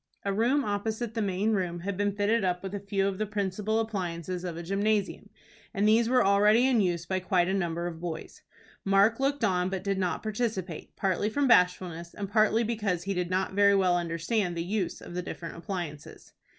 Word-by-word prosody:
A 200 - 0
room 245 +7 +2
opposite 220 +3 -2
the 225 - -1
main 200 +2 0
room 180 -4 -1
had 200 +2 -3
been 205 +1 0
fitted 205 +2 +1
up 180 -1 -1
with 195 0 -5
a 205 - -3
few 200 0 -1
of 195 0 -3
the 215 - -1
principal 210 +1 -1
appliances 180 -5 -3
of 175 -3 -4
a 170 - -5
gymnasium, 200 +3 -1 0.5
and 205 +1 +2
these 225 +2 +4
were 250 -3 +4
already 210 +4 +5
in 255 -4 +3
use 175 -3 0
by 185 +2 -1
quite 180 -1 +1
a 190 - 0
number 170 -3 -1
of 170 -2 -5
boys. 170 -2 -6 0.4
Mark 200 +4 +3
looked 275 -1 0
on, 180 -3 +2
but 190 -1 -4
did 195 -1 -1
not 185 -2 -1
participate, 210 -6 -3
partly 195 +2 0
from 280 +5 +1
bashfulness, 180 -5 +2
and 200 -1 -5
partly 220 +1 +3
because 210 -6 -1
he 195 +2 -2
did 180 -2 -2
not 185 +1 -1
very 200 0 +5
well 185 -2 +3
understand 175 +2 -1
the 165 - -1
use 190 0 -2
of - - -10
the 180 - -2
different 170 -1 -7
appliances. 170 -5 -7
195 Hz, 205 wpm, -28 LUFS, 180-215 Hz, 0.5 s, already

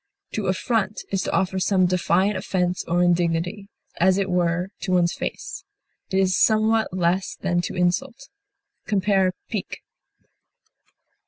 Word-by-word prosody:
To 215 - -2
affront 205 +2 -1
is 195 -1 0
to - - -3
offer 190 0 0
some 185 0 +3
defiant 185 +2 +2
offense 185 -2 -1
or 175 +1 +2
indignity, 175 +3 0 0.3
as 185 +2 +4
it 195 -1 -1
were, 175 +1 +1
to 185 - -2
one's 175 -1 +3
face; - - -5 0.5
it 190 - 0
is 190 -1 +3
somewhat 220 0 +3
less 180 +1 0
than 175 -2 0
to 175 - -5
insult. 220 +10 -1 0.6
Compare 195 -2 +2 0.2
PIQUE. 210 -4 -4
185 Hz, 135 wpm, -23 LUFS, 175-200 Hz, 0.6 s, as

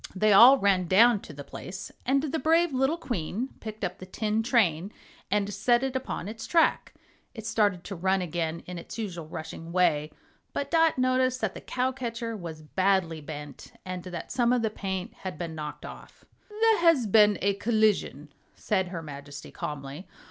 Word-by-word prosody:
They 210 +2 +4
all 245 +7 +9
ran 195 -6 +2
down 225 +5 +5
to - - -11
the 145 -1 -9
place, 185 +6 -8 0.2
and 275 +2 +2
the 310 +1 -2
brave 325 +2 +3
little 270 +5 +1
Queen 240 - -3
picked 215 -1 -8
up 180 - -3
the 185 - -9
tin 215 +3 -1
train 205 - +1 0.4
and 205 0 0
set 240 +5 +2
it 265 -1 -2
upon 255 -8 -3
its 225 +1 -7
track. 330 -2 +2 0.4
It 220 -2 -8
started 210 -6 +1
to 195 - -6
run 190 +2 +1
again 170 -2 -3
in 180 -1 -6
its 170 - -9
usual 175 -8 -5
rushing 160 +1 -7
way, 155 -4 +2 0.4
but 280 0 -3
Dot 325 -2 +4
noticed 255 0 +2
that 220 -4 -1
the - - -9
cow 255 +1 -1
catcher 235 -3 -4
was 165 -5 -8
badly 185 -1 +1
bent 145 -2 -9
and 185 -1 -5
that 175 -2 -7
some 240 -2 +2
of 250 -2 +2
the 220 - 0
paint 190 -3 -4
had 185 -5 -7
been 165 -1 -5
knocked 150 -1 -7
off. - - -12 0.2
"There 440 0 +3
has 330 -8 +4
been 210 0 +5
a 200 +1 +1
collision," 205 - 0 0.2
said 190 -3 0
her 175 -2 -6
Majesty, 145 -1 -9
calmly. 145 +4 -6
200 Hz, 185 wpm, -27 LUFS, 170-245 Hz, 0.4 s, all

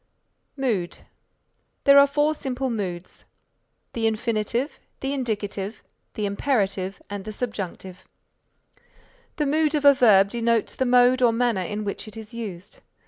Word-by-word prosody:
MOOD 220 -10 -1 0.9
There 280 0 +8
are 280 - +7
four 295 +2 +1
simple 265 -3 -3
moods, 185 -5 -5 0.7
the 225 -1 0
Infinitive, 230 +4 -1 0.2
the 270 +1 -2
Indicative, 210 -5 -3 0.3
the 210 - -2
Imperative 200 -3 -1
and 205 -1 -5
the 215 - -6
Subjunctive. 195 -5 -5 1.3
The 300 - 0
Mood 305 +2 +1
of 295 -1 -1
a 285 - +9
verb 200 -6 +5
denotes 230 -1 0
the 260 - -1
mode 250 +1 +5
or 240 -2 +5
manner 230 -4 +1
in 210 +4 -4
which 205 +1 -5
it 215 - -11
is 220 +1 -10
used. 200 -5 -7
225 Hz, 140 wpm, -24 LUFS, 200-260 Hz, 1.3 s, a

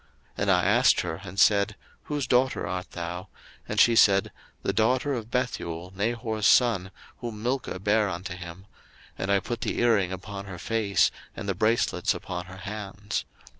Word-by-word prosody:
01:024:047 - - -33 0.3
And 100 0 +2
I 90 -1 +4
asked 120 +7 +4
her, 85 0 -4
and 95 0 -6
said, 100 +1 +4 0.3
Whose 145 -2 -2
daughter 130 +1 +2
art 90 +1 -4
thou? 90 +2 -5 0.4
And - - -1
she 115 - +6
said, 100 -3 +5 0.3
the 100 - 0
daughter 130 +7 +2
of 115 -3 -4
Bethuel, 90 -8 -3
Nahor's 110 0 0
son, 110 -7 +4 0.3
whom 110 -3 -6
Milcah 125 -5 -1
bare 105 +1 +2
unto 90 +1 -5
him: 90 +1 -9 0.5
and 95 - -2
I 100 - +4
put 120 +3 -5
the 115 - -2
earring 110 -6 +3
upon 100 +1 -6
her 95 -3 -8
face, 105 +1 +2 0.2
and - - -6
the 100 - +1
bracelets 110 +5 +1
upon 90 0 -5
her 95 0 -10
hands. 105 -1 -4
100 Hz, 170 wpm, -27 LUFS, 95-115 Hz, 0.5 s, she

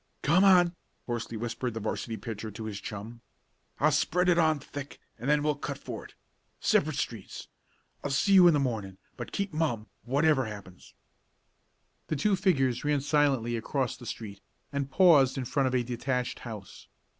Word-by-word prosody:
"Come 170 +6 +4
on!" 180 -3 +5 0.3
hoarsely 115 -1 -4
whispered 120 +1 -3
the - - -2
'varsity 110 +1 -3
pitcher 110 +1 -6
to 110 +2 -8
his 105 -2 -5
chum. 110 +3 -7 0.6
"I'll - - +4
spread 180 +2 +2
it 175 -1 +4
on 160 -2 +3
thick 145 0 -8 0.2
and 125 +5 -3
then 150 0 +3
we'll 150 0 +2
cut 145 - -5
for - - -7
it. - - -15 0.4
Separate 155 -1 +2
streets. 115 -7 -5 0.5
I'll 145 - -2
see 140 +9 +2
you 185 -2 +9
in 170 - +5
the - - +2
morning, 110 -8 -2 0.2
but - - -7
keep 200 -3 -3
mum, 145 -9 -1 0.2
whatever 140 +1 +2
happens." 100 -4 -10 1.1
The - - -1
two 195 +8 +2
figures 135 - +1
ran 145 -1 +1
silently 140 -5 +2
across 125 +2 -2
the 120 - -11
street, 100 -3 -7 0.3
and 140 -1 -2
paused 140 -4 +5
in 130 - -2
front 135 +2 +1
of 130 - 0
a 125 - +2
detached 125 +1 -2
house. 110 -5 -9
130 Hz, 175 wpm, -29 LUFS, 115-150 Hz, 1.1 s, you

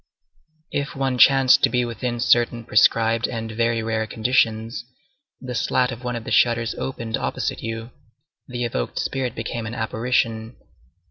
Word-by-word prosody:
If 145 +1 -3
one 135 -2 -1
chanced 135 -1 +6
to - - +4
be 125 -1 +1
within 120 +1 -4
certain 120 0 +2
prescribed 115 +2 +3
and 115 -2 -5
very 115 0 0
rare 110 0 -1
conditions, 115 0 0 0.6
the 125 -1 -6
slat 125 +2 +1
of 120 +2 -8
one 125 0 -3
of 115 - -5
the - - -7
shutters 115 -1 +3
opened 115 -4 -4
opposite - - -3
you; 115 +1 -5 0.6
the 120 -1 -3
evoked 65 - -3
spirit 130 -3 -2
became 115 0 -4
an 115 - -6
apparition. 115 0 -1
115 Hz, 150 wpm, -22 LUFS, 115-125 Hz, 0.6 s, chanced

